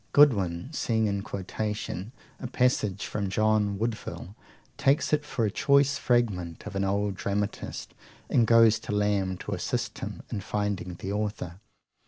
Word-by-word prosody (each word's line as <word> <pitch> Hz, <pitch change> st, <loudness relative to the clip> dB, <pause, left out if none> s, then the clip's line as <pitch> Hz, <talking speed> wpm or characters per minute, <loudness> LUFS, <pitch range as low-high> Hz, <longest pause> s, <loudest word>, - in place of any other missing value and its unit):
Godwin, 110 Hz, -, +4 dB
seeing 110 Hz, -6 st, +1 dB
in 100 Hz, -1 st, 0 dB
quotation 105 Hz, 0 st, -4 dB, 0.3 s
a 125 Hz, -, -4 dB
passage 120 Hz, -6 st, +1 dB
from 100 Hz, -2 st, -2 dB
John 105 Hz, 0 st, +2 dB
Woodvil, 110 Hz, -3 st, -4 dB, 0.4 s
takes 140 Hz, +3 st, +2 dB
it 150 Hz, 0 st, +3 dB
for 135 Hz, -6 st, -1 dB
a 105 Hz, -, 0 dB
choice 140 Hz, +4 st, +3 dB
fragment 100 Hz, -9 st, 0 dB
of 105 Hz, -1 st, -7 dB
an 100 Hz, -, +1 dB
old 100 Hz, +1 st, 0 dB
dramatist, 100 Hz, +2 st, -3 dB, 0.3 s
and 115 Hz, -2 st, +3 dB
goes 115 Hz, -1 st, +6 dB
to 110 Hz, -, -5 dB
Lamb 100 Hz, -3 st, +1 dB
to -, -, -7 dB
assist -, -, -2 dB
him -, -, -6 dB
in 100 Hz, -, -2 dB
finding 100 Hz, -3 st, -2 dB
the 95 Hz, +3 st, -5 dB
author. 100 Hz, -4 st, -3 dB
105 Hz, 150 wpm, -28 LUFS, 100-115 Hz, 0.4 s, goes